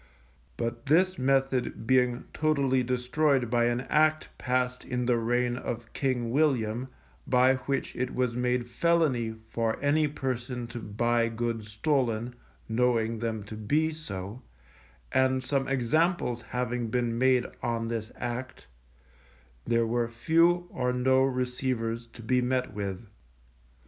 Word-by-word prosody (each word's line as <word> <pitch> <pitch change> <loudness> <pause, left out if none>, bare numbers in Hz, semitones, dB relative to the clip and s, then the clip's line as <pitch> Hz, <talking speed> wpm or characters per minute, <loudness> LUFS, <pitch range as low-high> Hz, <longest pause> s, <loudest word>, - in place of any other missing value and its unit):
But 115 +1 -4
this 185 +5 +3
method 135 -2 +1
being 125 0 +2
totally 140 -4 +2
destroyed 125 +1 +1
by 120 -1 +3
an 120 +1 +1
Act 155 +3 +2
passed 125 0 0
in 125 -1 -2
the 120 0 +3
reign 120 +1 +1
of 120 -2 -5
King 125 -4 -1
William, 125 -4 +1 0.4
by 130 +1 +4
which 135 -1 -1
it 125 0 -2
was 125 -2 0
made 125 0 0
felony 130 -5 +1
for 115 -1 -1
any 150 +2 +2
person 125 -3 -3
to 120 - -6
buy 115 +2 0
goods 115 -1 -3
stolen, 120 -1 0 0.3
knowing 115 -1 +1
them 110 -2 -3
to 105 +2 -8
be 150 +10 +1
so, 105 -7 -7 0.7
and 130 0 +2
some 135 0 0
examples 135 0 +1
having 125 0 -2
been 120 0 0
made 130 -1 +4 0.2
on 115 -1 -1
this 115 -1 -4
Act, 120 - -5 1.0
there 115 0 +2
were 120 +1 0
few 165 +9 +3
or 125 -1 0
no 130 +1 +3
receivers 125 -3 -1
to 115 0 -13
be 125 +3 +2
met 125 -2 -1
with. 100 0 -4
125 Hz, 135 wpm, -28 LUFS, 115-130 Hz, 1.0 s, by